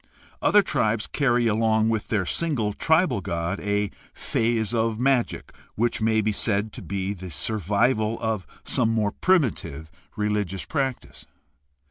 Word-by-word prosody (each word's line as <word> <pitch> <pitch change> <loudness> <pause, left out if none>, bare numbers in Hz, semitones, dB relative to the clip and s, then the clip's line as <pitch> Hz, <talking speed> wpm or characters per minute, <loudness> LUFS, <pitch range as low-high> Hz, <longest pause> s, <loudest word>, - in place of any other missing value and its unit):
Other 205 -1 +5
tribes 110 - 0
carry 120 -4 +1
along 110 0 +2
with 110 -2 -1
their 100 -4 0
single 120 - -1
tribal 160 - +2
god 85 +1 -2
a 105 0 -1 0.2
phase 115 -1 0
of 115 -1 0
magic 130 -2 0 0.2
which 115 +1 0
may 110 0 +3
be 110 +1 +1
said 105 +1 0
to - - -8
be 100 0 -3
the 95 -1 -8
sur 110 +8 -1
vival 110 +4 +1
of 110 -7 -2 0.2
some 115 - +1
more 110 -2 +1
primitive 105 - 0 0.2
religious 105 -3 -1
practice. 135 -5 -3
110 Hz, 140 wpm, -25 LUFS, 100-120 Hz, 0.2 s, Other